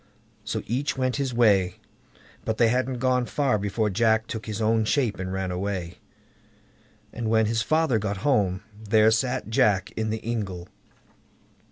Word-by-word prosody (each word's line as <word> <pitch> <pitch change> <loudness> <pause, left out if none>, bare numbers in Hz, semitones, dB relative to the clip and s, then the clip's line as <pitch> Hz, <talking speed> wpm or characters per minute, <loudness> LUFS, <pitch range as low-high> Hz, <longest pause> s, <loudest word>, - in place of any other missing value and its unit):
So - - -3
each 130 +6 -2
went 130 0 0
his 135 -2 -1
way; 105 -6 +3 0.7
but 110 -1 -2
they 115 0 +4
hadn't 125 +1 0
gone 125 0 +1
far 135 -7 +1
before 105 +1 -1
Jack 110 +1 +2
took 115 -1 -6
his 110 -1 -4
own 110 0 +2
shape 115 -3 0
and 95 0 -4
ran 95 -1 -2
away, 90 -2 -4 1.1
and 115 -2 -3
when 110 0 +3
his 115 +1 0
father 155 -3 +2
got 100 -1 -3
home, 100 -9 +1 0.2
there 110 +1 +4
sat 125 +1 -1
Jack 100 -3 +2
in 110 0 -3
the 110 0 -3
ingle. 95 -7 -3
110 Hz, 160 wpm, -25 LUFS, 100-120 Hz, 1.1 s, they